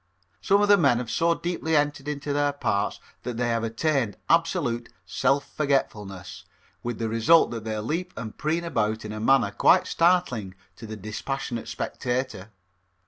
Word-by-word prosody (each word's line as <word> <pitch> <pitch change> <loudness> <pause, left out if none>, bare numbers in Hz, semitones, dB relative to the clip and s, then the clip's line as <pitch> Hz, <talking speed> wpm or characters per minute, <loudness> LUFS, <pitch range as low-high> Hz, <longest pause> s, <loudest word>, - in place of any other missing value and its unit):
Some 200 - +3
of - - +3
the 205 -1 +6
men 120 -8 +4
have 120 -2 -4
so 170 +5 +2
deeply 165 -2 -2
entered 145 -1 0
into 145 -1 -3
their 145 0 +1
parts 100 -7 -1 0.2
that 120 -2 -5
they 120 0 0
have 115 -1 0
attained 115 -1 0
absolute 125 -8 +1
self 135 +9 0
forgetfulness, 105 - -2 0.4
with 120 -2 -4
the 115 - -2
result 115 +9 +4
that 115 -2 -6
they 110 -1 -2
leap 165 +12 -3
and 110 -2 -6
preen 160 +3 -1
about 110 -10 -1
in 105 - -5
a 110 - -5
manner 115 -2 +3
quite 180 - +4
startling 165 - +1 0.2
to 115 - -9
the 110 0 -6
dispassionate 115 +4 -4
spectator. 120 -5 -3
125 Hz, 165 wpm, -25 LUFS, 110-155 Hz, 0.4 s, the